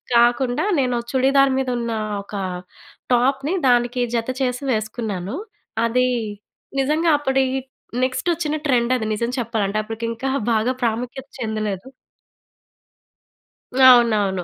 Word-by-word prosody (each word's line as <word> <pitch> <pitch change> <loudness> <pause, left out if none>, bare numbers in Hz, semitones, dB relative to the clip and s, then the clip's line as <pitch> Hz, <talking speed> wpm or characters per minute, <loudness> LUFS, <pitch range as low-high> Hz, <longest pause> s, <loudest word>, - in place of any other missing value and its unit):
కాకుండా 245 +6 +3
నేను 250 -2 +1 0.2
చుడిదార్ 270 +1 +4
మీద 260 -1 -1
ఉన్న 235 -1 -3 0.3
ఒక 205 - -10 0.8
టాప్‌‌‌‌‌‌ని 270 +7 +2
దానికి 245 +1 +2
జత 230 +1 -1 0.2
చేసి 250 +2 -2
వేసుకున్నాను. 215 -1 -3 0.5
అది 250 +2 +2 0.7
నిజంగా 310 +4 +2
అప్పటి 265 -2 +2 0.6
నెక్స్ట్ 255 +5 -1
వచ్చిన 310 -2 -1
ట్రెండ్ 245 -3 +2
అది 220 - -3
నిజం 235 +3 -1
చెప్పాలంటే, 215 -3 -1
అప్పటికి 225 +1 -5
ఇంకా 265 +4 -3 0.2
బాగా 225 +3 +2
ప్రాముఖ్యత 245 +4 -2
చెందలేదు. 215 0 -3 2.0
అవునవును. 215 -7 +5
245 Hz, 110 wpm, -21 LUFS, 225-265 Hz, 2.0 s, అవునవును